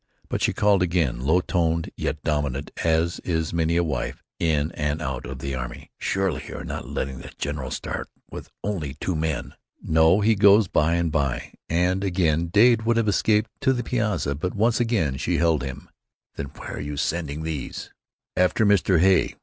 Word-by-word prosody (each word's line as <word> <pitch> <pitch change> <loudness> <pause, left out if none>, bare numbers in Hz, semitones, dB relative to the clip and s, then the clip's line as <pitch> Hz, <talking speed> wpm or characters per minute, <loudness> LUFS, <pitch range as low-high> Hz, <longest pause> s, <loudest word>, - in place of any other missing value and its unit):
But - - -2
she - - +3
called 100 -2 +3
again, 85 -9 +1
low 80 +8 +2
toned, 85 -2 0
yet 75 -1 -3
dominant, 75 -3 -1
as 80 +1 +1
is 80 -3 -2
many 85 0 +1
a 85 - +3
wife 75 -3 -3 0.2
in 80 -2 +1
and 75 +1 -2
out 65 -5 -4
of 65 +1 -6
the 70 +1 -4
army. 60 -2 -6
"Surely 95 -5 0
you - - -7
are - - -6
not - - -5
letting 65 -1 -3
the - - -10
general 70 -2 -3
start - - -4 0.2
with - - -8
only 80 -10 -3
two 90 +4 -2
men!" 80 -1 -2 0.3
"No, 80 +5 +4
he 110 +2 +4
goes 100 0 +6
by 80 +1 +2
and 85 -2 0
by." 70 -3 -1 0.2
And 90 +3 +1
again 85 -4 +1
Dade 110 +6 +5
would 115 +1 +1
have 115 -2 +2
escaped 105 +2 +2
to 130 - +3
the 120 -1 -2
piazza, 105 - 0
but 85 +6 -3
once 115 +3 +2
again 100 - +1
she 85 +3 0
held 80 -2 +2
him. 65 +1 -6 0.5
"Then 70 - -4
where - - -8
are - - -4
you 75 0 -5
sending 80 0 -2
these?" 80 -5 -5 0.4
"After 90 +4 +3
Mr. 95 -3 +4
Hay. 95 +1 +3
85 Hz, 190 wpm, -24 LUFS, 75-95 Hz, 0.5 s, goes